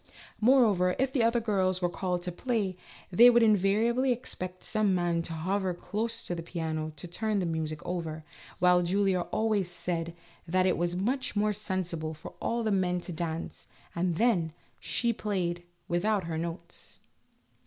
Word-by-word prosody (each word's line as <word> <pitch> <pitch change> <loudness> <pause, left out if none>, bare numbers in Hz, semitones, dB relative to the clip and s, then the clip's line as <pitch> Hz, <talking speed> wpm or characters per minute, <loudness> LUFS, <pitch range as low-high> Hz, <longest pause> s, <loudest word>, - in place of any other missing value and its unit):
Moreover, 215 -7 +4
if 265 0 0
the 260 - +2
other 230 +1 +3
girls 190 -5 +1
were 180 - +1
called 180 0 -2
upon 180 - -2
to - - -19
play, 220 -7 0 0.4
they 235 +7 +8
would 240 -1 +5
invariably 220 +5 +3
expect 185 -6 -4
some 215 -3 +1
man 175 -1 +1
to 165 - -6
hover 185 +3 -1
close 225 +5 -3
to - - -3
the 170 - -4
piano 160 -2 -3
to 180 - -8
turn 215 +5 -1
the 190 - 0
music 160 -2 -3
over, 160 -3 -4 0.3
while 180 0 +5
Julia 190 +1 +2
always 215 -5 +1
said 170 -1 -3 0.3
that 185 +2 +2
it 185 - +3
was 175 +1 -1
much 240 +7 -1
more 210 +1 +2
sen 190 -2 -2
sible 160 -2 -5
for 155 - -10
all 235 0 0
the 215 - 0
men 180 -2 +1
to 175 - -6
dance, 165 0 -5 0.3
and 175 0 0
then, 175 -7 +2 0.3
she 235 -1 0
played 180 -5 -2 0.3
without 195 +3 +1
her 165 -1 -4
notes. 170 +1 -6
185 Hz, 175 wpm, -29 LUFS, 170-215 Hz, 0.4 s, they